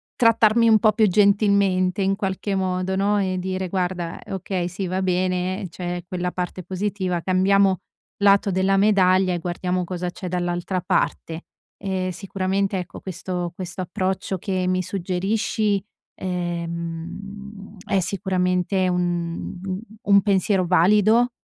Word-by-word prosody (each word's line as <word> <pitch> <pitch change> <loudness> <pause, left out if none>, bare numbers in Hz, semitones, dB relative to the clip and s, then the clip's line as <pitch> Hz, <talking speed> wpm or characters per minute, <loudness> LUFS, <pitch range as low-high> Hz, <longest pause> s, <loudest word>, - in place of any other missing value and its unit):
trattarmi 230 0 +4
un 220 - +7
po' 215 +1 +4
più 215 0 +4
gentilmente, 200 -2 +3
in 195 +1 +2
qualche 195 0 -2
modo, 185 0 -1
no, 205 +2 +2
e 185 -2 -1
dire: 185 0 -3
"Guarda, 180 -2 -2
okay 185 -2 -2
sì 190 +2 -4
va 185 +1 -1
bene 185 +1 0
c'è 175 0 -5
quella 180 0 -2
parte 180 0 -4
positiva, 185 -1 -2
cambiamo 190 +1 +3 0.4
lato 200 0 +4
della 190 +1 +2
medaglia 190 -2 +4
e 175 - -2
guardiamo 180 +1 -2
cosa 180 0 -3
c'è 185 - -7
dall'altra 175 +1 -2
parte." 165 -1 -1 0.3
Ehm, 190 -2 -2
sicuramente, 195 +1 -1
ecco, 180 - -7
questo 180 -1 -4
questo 180 0 -6
approccio 185 +1 -2
che 185 0 -2
mi 185 0 +1
suggerisci, 195 +3 -1 0.3
ehm, 180 +4 -5
è 195 - +2
sicuramente 185 0 0
un 175 0 -2 0.4
un 200 0 +5
pensiero 195 -1 +2
valido 210 +7 +4
185 Hz, 130 wpm, -23 LUFS, 180-200 Hz, 0.4 s, un